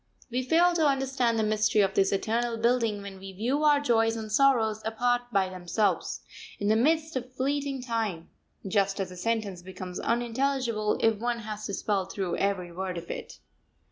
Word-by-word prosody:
We 250 +2 0
fail 335 +7 +4
to 320 -3 +3
understand 265 -4 +1
the 220 - +2
mystery 215 0 +2
of 195 -1 +2
this 195 0 +3
eternal 230 +4 0
building 230 -3 +1
when 195 -1 -8
we 195 0 -9
view 250 +10 0
our 295 -1 +5
joys 225 -5 +2
and 220 -1 -6
sorrows 225 -4 +3
apart 245 +2 0
by 195 -3 +2
themselves, 185 +3 -1 0.4
in 205 - -1
the 215 - +4
midst 315 +6 +2
of 255 0 -4
fleeting 275 0 -1
time; 220 -9 -3 0.4
just 195 0 +1
as 190 -2 -2
a - - -9
sentence 200 -1 -2
becomes 185 0 -7
unintelligible 235 -2 0
if 225 -2 +3
one 240 +1 -1
has 215 0 -5
to 200 - -3
spell 200 -3 0
through 190 -2 -3
every 190 -3 -1
word 185 +1 -4
of 170 0 -6
it. - - -7
225 Hz, 180 wpm, -28 LUFS, 195-250 Hz, 0.4 s, our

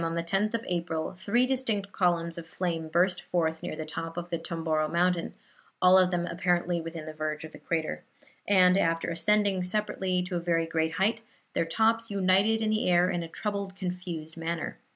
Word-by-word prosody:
on 165 0 -1
the 170 - -1
10th 195 +5 0
of 230 - -3
April, 170 -3 -2
three 210 +7 +2
distinct 230 -7 -1
columns 170 -3 +1
of 165 - -10
flame 165 -2 -2
burst 180 +3 +2
forth 160 -2 -1
near - - -4
the 155 0 -5
top 165 +2 -6
of 175 0 -5
the 170 - 0
Tomboro 165 -2 -1
mountain 175 0 +1 0.4
(all 185 0 +6
of 185 -1 +6
them 175 -1 -1
apparently 175 0 0
within 165 -1 -7
the 155 - -7
verge 155 0 -3
of 160 - -8
the - - -12
crater), 160 -2 -2 0.4
and, 185 -1 +5
after 165 -1 0
ascending 200 +2 +2
separately 185 -1 +1
to 180 0 -4
a - - +1
very 170 -1 +1
great 160 -1 -1
height, 215 +6 +1 0.3
their - - +1
tops 225 +6 +1
united 200 +3 +3
in 215 - +1
the 215 -3 +1
air 180 +1 +4
in 175 - -1
a 165 - -5
troubled, 200 +2 -4
confused 180 -4 -5
manner. 165 0 -4
175 Hz, 195 wpm, -28 LUFS, 165-195 Hz, 0.4 s, all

